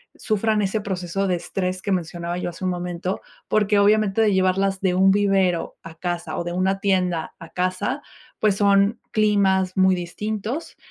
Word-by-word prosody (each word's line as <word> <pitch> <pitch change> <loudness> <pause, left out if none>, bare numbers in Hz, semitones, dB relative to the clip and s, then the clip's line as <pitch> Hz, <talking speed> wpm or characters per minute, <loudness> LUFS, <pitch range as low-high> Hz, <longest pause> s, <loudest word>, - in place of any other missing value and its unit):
sufran 215 -1 0
ese 200 +2 0
proceso 195 -1 -2
de 180 - +1
estrés 185 +1 -3
que 200 - -3
mencionaba 175 -1 -2
yo 180 - -3
hace 170 +1 -10
un 185 - +1
momento, 180 +1 -3 0.3
porque 210 -1 +2
obviamente 210 +1 +3
de 215 -2 +3
llevarlas 190 +1 +1
de 185 -2 +1
un 190 +1 +5
vivero 195 -4 +1
a 165 - -10
casa 175 0 -4
o 170 - -3
de 175 - -3
una 190 +2 0
tienda 180 -4 0
a 165 - -11
casa, 185 +10 -2 0.4
pues 210 -2 +3
son 200 +2 +3
climas 195 -3 +2
muy 190 0 +4
distintos. 210 - -4
190 Hz, 170 wpm, -23 LUFS, 180-205 Hz, 0.4 s, un